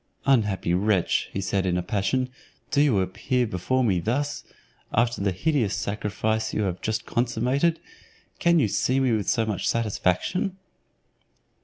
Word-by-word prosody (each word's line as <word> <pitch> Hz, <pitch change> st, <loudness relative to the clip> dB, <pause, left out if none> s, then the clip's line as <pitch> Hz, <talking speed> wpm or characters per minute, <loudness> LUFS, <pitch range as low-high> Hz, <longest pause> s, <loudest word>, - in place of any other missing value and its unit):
"Unhappy 105 Hz, -10 st, +2 dB
wretch!" 95 Hz, 0 st, +1 dB
said 95 Hz, 0 st, 0 dB
he -, -, +1 dB
in 90 Hz, -, +1 dB
a 90 Hz, -, -1 dB
passion, 105 Hz, +8 st, 0 dB, 0.4 s
"do 145 Hz, -, +3 dB
you 125 Hz, -10 st, +3 dB
appear 125 Hz, +7 st, 0 dB
before 115 Hz, +6 st, 0 dB
me 95 Hz, -7 st, +2 dB
thus? 135 Hz, -, -2 dB, 0.5 s
after 120 Hz, -1 st, +1 dB
the 100 Hz, -1 st, +1 dB
hideous 115 Hz, -, 0 dB
sacrifice 105 Hz, +2 st, -2 dB
you 105 Hz, -, +1 dB
have 95 Hz, -2 st, -2 dB
just 110 Hz, 0 st, -2 dB
consummated, 125 Hz, +7 st, +1 dB, 0.6 s
can 170 Hz, 0 st, +4 dB
you 140 Hz, -9 st, +3 dB
see 130 Hz, +6 st, +1 dB
me 130 Hz, -2 st, +2 dB
with 110 Hz, -3 st, 0 dB
so 115 Hz, -, +2 dB
much 105 Hz, -3 st, -1 dB
satisfaction?" 115 Hz, -, 0 dB
110 Hz, 150 wpm, -25 LUFS, 100-130 Hz, 0.6 s, can